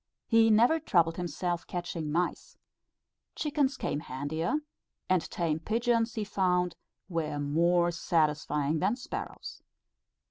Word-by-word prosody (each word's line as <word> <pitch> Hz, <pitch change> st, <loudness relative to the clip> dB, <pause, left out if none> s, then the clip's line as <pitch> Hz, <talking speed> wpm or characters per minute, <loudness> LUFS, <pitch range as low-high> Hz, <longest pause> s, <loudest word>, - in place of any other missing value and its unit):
He 225 Hz, -1 st, +5 dB
never 235 Hz, +9 st, +5 dB
troubled 170 Hz, -, +2 dB
himself 175 Hz, -1 st, -3 dB
catching 170 Hz, -3 st, -4 dB
mice, 175 Hz, +3 st, -2 dB, 0.8 s
chickens 285 Hz, -3 st, 0 dB
came 145 Hz, -, -2 dB
handier; 150 Hz, -, -2 dB, 0.5 s
and 180 Hz, -4 st, +1 dB
tame 160 Hz, -3 st, -1 dB
pigeons 230 Hz, +4 st, +1 dB
he 220 Hz, -, -1 dB
found 180 Hz, -4 st, +1 dB, 0.3 s
were 165 Hz, -5 st, -2 dB
more 170 Hz, +4 st, +2 dB
satisfying 155 Hz, -2 st, +1 dB
than 195 Hz, +7 st, +1 dB
sparrows. 250 Hz, -, -7 dB
175 Hz, 110 wpm, -30 LUFS, 160-220 Hz, 0.8 s, He